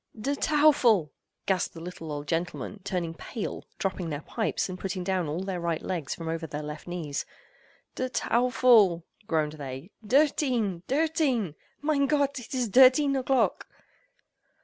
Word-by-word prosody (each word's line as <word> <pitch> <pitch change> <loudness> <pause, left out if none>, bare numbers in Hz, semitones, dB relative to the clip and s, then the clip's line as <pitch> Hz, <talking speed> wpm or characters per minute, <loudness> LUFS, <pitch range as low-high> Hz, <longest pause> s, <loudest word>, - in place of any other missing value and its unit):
"Der 275 +6 -1
Teufel!" 280 - +4 0.3
gasped 185 -3 0
the - - -7
little 165 -2 -7
old 145 0 -5
gentlemen, 175 +4 -3
turning 175 -4 -2
pale, 215 +6 -6
dropping 190 -3 -2
their 145 0 -4
pipes, 225 - -1
and 185 -1 -7
putting 185 -1 -3
down 185 -3 0
all 155 +5 -3
their 190 -2 -3
right 170 -2 -2
legs 170 -8 -3
from 165 - -7
over 165 0 -3
their 150 0 -5
left 150 +2 -7
knees. 165 -5 -3 0.7
"Der 255 0 -2
Teufel!" 235 -8 +4 0.2
groaned 155 -2 +1
they, 140 +3 -7
"Dirteen! 245 - +2
Dirteen!!—Mein 280 - 0
Gott, 280 -2 +1
it 250 +2 -7
is 250 -2 0
Dirteen 265 +5 +6
o'clock!!" 265 0 +1
195 Hz, 145 wpm, -27 LUFS, 165-255 Hz, 0.7 s, Dirteen